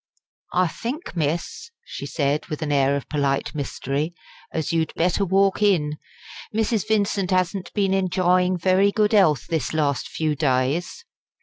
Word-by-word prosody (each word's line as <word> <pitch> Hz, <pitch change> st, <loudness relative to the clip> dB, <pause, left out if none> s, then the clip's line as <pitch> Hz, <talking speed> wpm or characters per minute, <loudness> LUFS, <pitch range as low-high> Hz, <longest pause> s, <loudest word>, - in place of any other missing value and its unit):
"I 180 Hz, +1 st, +4 dB
think, 260 Hz, -, -6 dB
miss," 165 Hz, -, -2 dB, 0.2 s
she -, -, -7 dB
said, 145 Hz, 0 st, -1 dB
with 155 Hz, +1 st, -4 dB
an 150 Hz, -, -2 dB
air 140 Hz, -1 st, +3 dB
of 140 Hz, -, -4 dB
polite 140 Hz, -2 st, -1 dB
mystery, 145 Hz, +2 st, -3 dB, 0.4 s
"as 160 Hz, 0 st, -2 dB
you'd 160 Hz, -2 st, +1 dB
better 180 Hz, +4 st, +1 dB
walk 195 Hz, +1 st, +2 dB
in. 150 Hz, -8 st, +2 dB, 0.5 s
Mrs. 220 Hz, -1 st, 0 dB
Vincent 200 Hz, -3 st, +1 dB
'asn't 185 Hz, 0 st, 0 dB
been 195 Hz, -2 st, +1 dB
enjyin' 185 Hz, -1 st, +2 dB
very 190 Hz, +3 st, +3 dB
good 210 Hz, +1 st, +1 dB
'ealth 160 Hz, -, +4 dB
this 160 Hz, -4 st, -2 dB
last 145 Hz, -3 st, 0 dB
few 155 Hz, -2 st, -1 dB
days." 145 Hz, -, 0 dB
175 Hz, 145 wpm, -23 LUFS, 150-195 Hz, 0.5 s, I